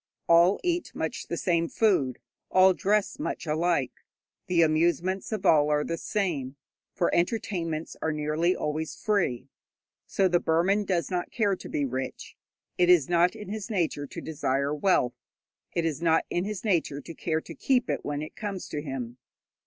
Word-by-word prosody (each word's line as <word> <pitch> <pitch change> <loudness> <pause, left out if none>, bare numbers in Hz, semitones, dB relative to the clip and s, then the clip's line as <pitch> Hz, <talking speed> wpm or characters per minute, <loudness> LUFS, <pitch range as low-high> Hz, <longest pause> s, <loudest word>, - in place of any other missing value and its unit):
All 170 +3 +5
eat 350 -1 -1
much - - -3
the - - -3
same 170 -3 +1
food, 175 - +2 0.3
all 185 0 +6
dress 210 +7 0
much 300 - -3
alike. 160 -3 0 0.4
The 170 -2 +4
amusements 170 +5 +1
of 210 -3 -3
all 150 -4 +5
are 150 0 +2
the 165 - -2
same, 165 -9 -2 0.4
for 175 - +1
entertainments 170 -4 -1
are 160 - 0
nearly 155 +4 0
always 155 +1 -3
free. 175 - 0 0.6
So 195 - +2
the 175 -1 +3
Burman 185 +6 +2
does 180 -3 -1
not 180 -1 -2
care 205 -5 +1
to - - -10
be 145 - -1
rich. 130 0 -5 0.4
It 175 0 +4
is 175 -6 +5
not 175 +3 +3
in 210 -3 -8
his 215 +1 -5
nature 165 -8 -1
to - - -8
desire 140 -2 -1
wealth, 150 -6 +2 0.6
it 170 - +1
is 160 -1 -2
not 165 -1 +3
in 175 +2 0
his 210 -2 -4
nature 170 -8 +1
to 165 - -9
care 160 -1 -2
to - - -10
keep 255 -2 +1
it - - -2
when 145 0 -3
it 155 - -9
comes 200 -4 -5
to 150 - -3
him. 130 -4 -6
170 Hz, 175 wpm, -27 LUFS, 150-190 Hz, 0.6 s, all